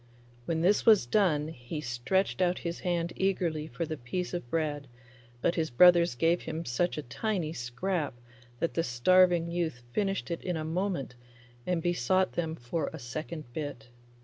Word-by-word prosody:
When 160 +2 -1
this 195 +5 +3
was 215 - +6
done 155 - +2
he 125 +1 -6
stretched 135 +10 0
out 180 0 +2
his 170 0 -3
hand 170 -1 -1
eagerly 170 -5 0
for 165 +1 -3
the 155 0 -4
piece 175 +10 -4
of 175 -9 -4
bread, 150 -2 -1 0.5
but 170 - +2
his 160 -2 -1
brothers 175 +3 +6
gave 165 +7 +2
him 160 +1 -5
such 160 +8 0
a 150 - -3
tiny 160 - -2
scrap 145 +4 -2 0.4
that 165 - 0
the 165 - +1
starving 170 +5 +4
youth 160 -8 -2
finished 195 -3 -1
it 170 - -3
in 180 -3 -2
a 155 - -3
moment 170 -5 -2 0.5
and 175 -3 0
besought 175 +2 +2
them 160 -2 -2
for 145 +3 -3
a - - -7
second 155 +2 -6
bit. 145 -7 -5
165 Hz, 170 wpm, -30 LUFS, 145-180 Hz, 0.5 s, was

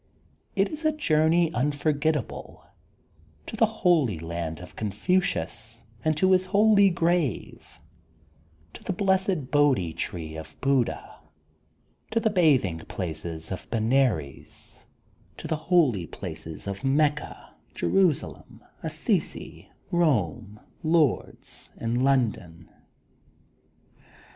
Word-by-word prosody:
It 195 0 +2
is 310 +1 -6
a 310 - +3
journey 165 - +2
unforgettable 150 +3 -1 0.4
— - - -32
^to - - -6
the 225 0 +4
holy 170 - +2
land 80 0 -5
of 90 - -12
Confucius 110 - -1 0.2
and 155 -1 +1
to 185 +3 +3
his 185 0 +3
holy 200 0 +5
grave, 170 - -1 1.0
to - - -11
the - - -2
Blessed 190 -6 0
Bohdi 135 - +3
Tree 80 -3 -5
of 80 0 -10
Buddha, 135 -3 0 0.9
to 230 - +1
the 220 -1 +1
bathing 140 - +3
placed 80 -4 -5 0.3
of 95 - -6
Benares, 115 - -1 0.6
to - - -7
the 160 - 0
holy 130 - +3
places 80 0 -8
of 100 +4 -5
Mecca, 145 +2 0 0.2
Jerusalem, 185 -7 0 0.2
Assisi, - - -3 0.2
Bome, 105 - 0 0.2
Lourdes, 160 -4 0
and 120 +2 -1
Lon 130 -4 +3
don. 85 -5 -14
145 Hz, 105 wpm, -26 LUFS, -, 1.0 s, holy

